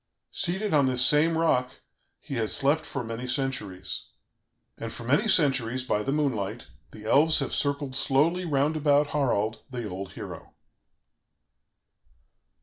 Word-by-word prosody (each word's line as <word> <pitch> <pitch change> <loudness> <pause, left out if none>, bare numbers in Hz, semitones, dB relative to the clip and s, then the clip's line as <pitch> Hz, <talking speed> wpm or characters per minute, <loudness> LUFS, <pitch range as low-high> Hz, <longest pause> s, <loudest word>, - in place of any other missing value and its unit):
"Seated 190 +3 -2
on 140 -3 +4
this 125 -1 +2
same 160 +2 +4
rock, 130 -6 +1 0.4
he - - -9
has 115 -4 +1
slept 145 +3 +1
for 140 - -4
many 115 +2 -5
centuries 110 -9 -3 0.7
and 115 - -6
for 120 - -8
many 145 - +2
centuries, 135 - +2
by 105 -4 0
the 135 - -2
moonlight, 120 -7 -1 0.2
the 110 - -12
elves 155 +7 +4
have - - -1
circled 140 -1 -1
slowly 150 +7 +2
round 150 -1 +1
about 145 -1 +2
Harald, 110 -6 0
the 120 -4 -5
old 95 -1 -7
hero." - - -9
135 Hz, 140 wpm, -27 LUFS, 115-150 Hz, 0.7 s, on